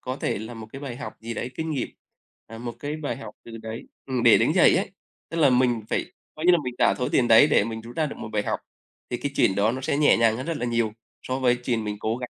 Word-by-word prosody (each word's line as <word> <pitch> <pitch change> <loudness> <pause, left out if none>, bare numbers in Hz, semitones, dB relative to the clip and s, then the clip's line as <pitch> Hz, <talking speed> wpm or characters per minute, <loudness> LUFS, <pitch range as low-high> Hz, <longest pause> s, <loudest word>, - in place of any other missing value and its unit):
có 130 +1 -4
thể - - -2
là 110 +3 -7
một 110 -1 -9
cái 135 - -7
bài 130 -4 -6
học - - -7
gì 115 +1 -5
đấy 125 - -4
kinh 160 +4 -3
nghiệm, 135 -5 -2 0.6
ờ, 115 0 -10
một 120 -1 -6
cái 145 +3 -4
bài 145 -6 -3
học 135 - -9
từ 115 -1 -9
đấy. 110 +1 -6 0.2
Ừm, 130 -3 -1
để - - +7
đứng - - +2
dậy - - +6
ấy. - - -1 0.4
Tức 165 - -6
là 150 -4 +5
mình 125 -3 +2
phải - - -2 0.2
coi 155 - -7
như 180 - +8
là 175 - +5
mình 125 -1 -4
trả - - +4
số 125 - 0
tiền 120 - +2
đấy 115 +6 +8
để 100 - +3
mình 110 0 -5
rút 115 +2 -11
ra 155 - +1
được 140 - -7
một - - -7
bài 105 - +1
học - - -2 0.5
thì 120 - -1
cái 140 +3 -4
chuyện 95 - +3
đó 105 +4 +2
nó 130 - -4
sẽ 135 +1 -1
nhẹ 150 0 +5
nhàng 115 -1 +3
hơn 130 - -5
rất 165 - -2
là 120 - -2
nhiều, 115 -2 0 0.3
so 130 +1 -2
với 125 -2 +3
chuyện 115 -3 -1
mình 105 0 -3
cố 110 +2 -1
gắng 125 0 -6
120 Hz, 300 wpm, -25 LUFS, 115-135 Hz, 0.6 s, như